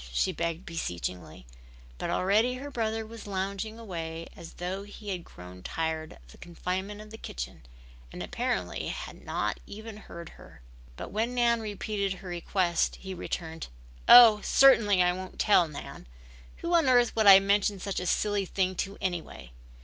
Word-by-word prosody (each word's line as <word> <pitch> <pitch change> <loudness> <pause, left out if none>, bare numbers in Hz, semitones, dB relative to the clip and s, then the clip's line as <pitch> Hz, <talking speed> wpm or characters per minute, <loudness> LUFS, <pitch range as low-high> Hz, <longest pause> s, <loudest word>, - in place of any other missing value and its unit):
she - - +1
begged 170 +2 -3
beseechingly, 90 - -5 0.5
but - - -3
already 215 +7 +2
her 280 +3 -7
brother 225 -3 -2
was 225 -1 -10
lounging 200 +3 -3
away 165 -6 -6
as 165 -1 -11
though 185 +2 -4
he 205 +1 -10
had 180 -3 -3
grown 90 - -12
tired 160 - -3
of - - -18
the - - -17
confinement 185 +4 -4
of 215 0 -11
the 220 - -10
kitchen 60 +1 -7 0.5
and - - -6
apparently - - -2
had - - -7
not - - -2
even 220 +1 -9
heard 170 -5 -10
her. 60 - -16 0.3
But - - -7
when 225 +4 -1
Nan 235 -1 +3
repeated 205 -2 -2
her 185 0 -10
request 175 0 0
he 190 -1 -8
returned. 165 -2 -5 0.4
"Oh, 230 -4 +10
certainly 210 -9 +5
I 180 0 +3
won't 185 0 -8
tell, 190 -5 +4
Nan. 145 - -9 0.5
Who 340 +1 -3
on 330 -6 +4
earth 245 -2 +4
would 220 -2 +3
I 195 -1 +11
mention 200 0 +1
such 195 +1 -3
a 180 - -4
silly 205 -1 +1
thing 185 0 0
to 195 +1 -3
anyway? 175 - -4
195 Hz, 165 wpm, -28 LUFS, 170-220 Hz, 0.5 s, I